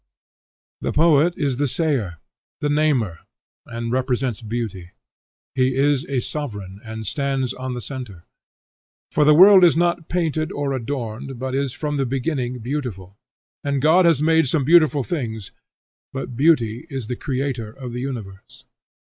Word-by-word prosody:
The - - -2
poet 165 +2 +4
is 140 -4 -1
the 145 +1 +1
sayer, 130 - -1 0.4
the 145 - -1
namer, 140 - +1 0.5
and 115 0 -4
represents 125 -2 -1
beauty. 105 -6 -5 0.6
He 130 0 +1
is 140 0 +2
a 135 -3 -1
sovereign, 105 -8 -6
and 110 -1 -7
stands 135 +1 -1
on 130 -1 -5
the 120 - -5
centre. 120 -10 -8 0.9
For 150 - +3
the 150 0 +6
world 190 +2 +8
is 170 -3 +6
not 170 -1 0
painted 160 -3 -1
or 145 -1 -2
adorned, 125 -1 -4
but 130 +1 -4
is 135 -1 -1
from 150 +1 -3
the 135 -2 0
beginning 130 -1 -2
beautiful; 115 -8 -5 0.5
and 140 -1 0
God 160 +6 +5
has 160 -4 +3
not - - +2
made 160 -2 +4
some 145 +2 +1
beautiful 155 -3 +5
things, 115 - -4 0.6
but 135 -2 -5
Beauty 130 -2 +2
is 135 -5 -4
the 125 - -4
creator 130 -4 -3
of 125 0 -8
the 125 - -4
universe. 110 -8 -7
135 Hz, 155 wpm, -22 LUFS, 120-150 Hz, 0.9 s, world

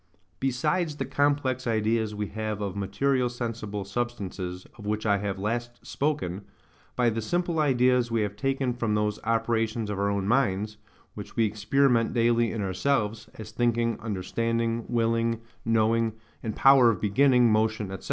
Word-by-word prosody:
Besides 150 +5 0
the - - -2
complex 140 -3 0
ideas 110 -1 0
we 105 0 -2
have 110 -1 -4
of 100 -2 -3
material 125 +6 0
sensible 115 -4 -4
substances, 100 -5 -4
of - - -9
which 105 +1 -1
I 100 -2 +3
have 100 -1 -3
last 120 +4 -4
spoken,—by 120 - -3
the 115 +1 -2
simple 175 +6 -1
ideas 125 -4 +3
we 115 -1 0
have 100 -1 -2
taken 135 +2 -1
from 115 -3 -1
those 105 0 0
operations 115 -1 0
of 100 - -3
our 100 0 +1
own 100 -1 -1
minds, 105 -4 +1 0.4
which 105 - -9
we 115 - +3
experiment 115 +3 +2
daily 115 -1 +3
in 110 -3 -3
ourselves, 105 +3 -1
as 110 0 -9
thinking, 115 0 0
understanding, 115 +2 -2
willing, 115 -1 +1 0.3
knowing, 115 0 +2 0.3
and 110 -3 -4
power 135 -3 +6
of 115 - 0
beginning 125 +2 +4
motion, 110 -1 +1
&c. 95 - -4
115 Hz, 150 wpm, -27 LUFS, 105-120 Hz, 0.4 s, power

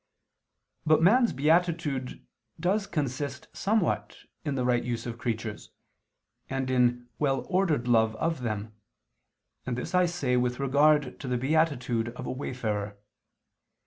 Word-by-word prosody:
But 155 +1 +4
man's 235 +6 +5
beatitude 155 -3 0 0.3
does 195 +4 +1
consist 140 -3 -3
somewhat 165 - 0 0.3
in 145 -3 -2
the 125 -2 0
right 120 -1 +2
use 120 -1 -3
of 120 -1 -6
creatures, 110 -2 -4 0.8
and 130 -1 -2
in 125 -1 +2
well 135 -3 +1
ordered 175 -10 +1
love 110 -2 +3
of 160 +4 -1
them: 110 -2 -3 0.9
and 125 -1 -3
this 125 - -5
I 180 -1 +4
say 140 -8 0
with 125 +1 0
regard 140 0 +3
to - - -6
the 125 -1 0
beatitude 130 -4 +1
of 125 - -7
a - - -3
wayfarer. 105 -6 -3
130 Hz, 135 wpm, -28 LUFS, 120-155 Hz, 0.9 s, man's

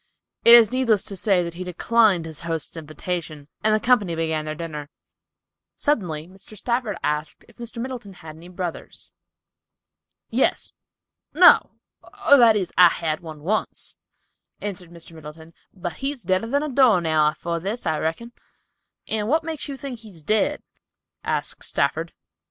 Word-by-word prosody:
It 235 - +10
is 230 -3 +7
needless 245 -6 +2
to 200 - -6
say 190 -2 +2
that 170 -1 -5
he 180 +2 -6
declined 185 0 +2
his 160 -2 -7
host's 165 -1 -4
invitation, 155 -1 -5 0.2
and 215 - +3
the - - +1
company 210 -7 +2
began 160 -1 -1
their 155 0 -4
dinner. 150 -3 -6 0.9
Suddenly 175 - -1
Mr. 195 +3 -14
Stafford 235 -3 -1
asked 150 +1 -2
if 235 - -21
Mr. 235 0 -8
Middleton 240 -5 -6
had 160 -3 -11
any 165 +2 -13
brothers. 180 -2 -6 1.2
"Yes—no, 355 +3 +2 0.5
or, 285 - +9
that 230 -4 +6
is, 190 -4 -2
I 180 -1 +8
had 155 -2 -2
one 155 -3 -10
once," 215 +6 -2 0.6
answered 185 -4 -6
Mr. 170 -1 -8
Middleton, 160 +1 -12 0.2
"but 175 -3 -6
he's 270 -2 -4
deader 185 +4 0
than 285 +5 0
a 305 - -3
door 255 -7 +5
nail 155 -2 +2
afore 170 +2 -2
this, 200 +7 -4
I 160 -2 0
reckon." 165 +10 -3 0.8
"And 215 -1 -2
what 315 +6 +2
makes 315 -1 -5
you 280 -1 -6
think 265 -4 -7
he 220 -1 -12
is 165 -6 -17
dead?" 215 +6 +1 0.6
asked - - -3
Stafford. - - -1
185 Hz, 155 wpm, -23 LUFS, 160-230 Hz, 1.2 s, It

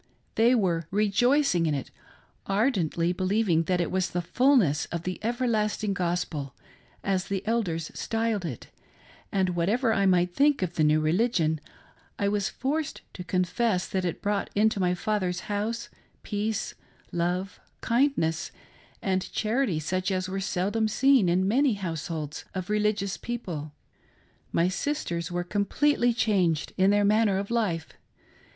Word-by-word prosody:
They 235 +3 +4
were 170 -7 0
rejoicing 210 - +2
in 150 - +1
it, 135 - -5 0.6
ardently 190 - +1
believing 185 -3 +1
that 180 +1 +1
it 175 - -1
was 185 -1 0
the 175 - -2
fulness 235 - +3
of 170 -1 -5
the 185 +1 -4
everlasting 220 -3 0
gospel, 170 -7 -2 0.5
as 190 -2 0
the 195 -1 -3
elders 185 -8 -1
styled; 225 -3 -1
it; 145 -9 -6 0.6
and 190 -2 +1
whatever 210 +8 +1
I 200 -1 +2
might 180 -1 +3
think 285 -3 +3
of 175 -2 -2
the 160 - +1
new 155 +1 +4
religion 160 -2 +1 0.6
I 200 - +1
was 205 -1 0
forced 295 +3 -2
to 180 - -7
confess 185 +2 0
that 190 -1 -1
it 175 - -3
brought 205 0 0
into 210 0 +3
my 180 -1 +2
father's 185 -2 -1
house 225 +3 -3 0.4
peace, 215 +1 -2 0.4
lov6) 180 +3 -1 0.2
kindness, 230 - +1 0.5
and 190 -1 -1
charity 220 - 0
such 185 +5 -1
as 185 -1 -1
were 195 +1 -3
seldom 200 +4 0
seen 255 -3 +4
in 185 +2 +2
many' 255 +2 +3
households 165 -5 -4
of 185 +1 -4
religious 210 -2 0
people. 175 -11 -5 0.8
My 170 - +2
sisters 180 - -2
were 175 0 -1
completely 240 +7 +1
changed 190 -9 +1
in 190 +1 +4
their 205 0 +3
manner 210 -1 +3
of 200 +3 -4
life. 185 -9 0
195 Hz, 145 wpm, -27 LUFS, 175-220 Hz, 0.8 s, They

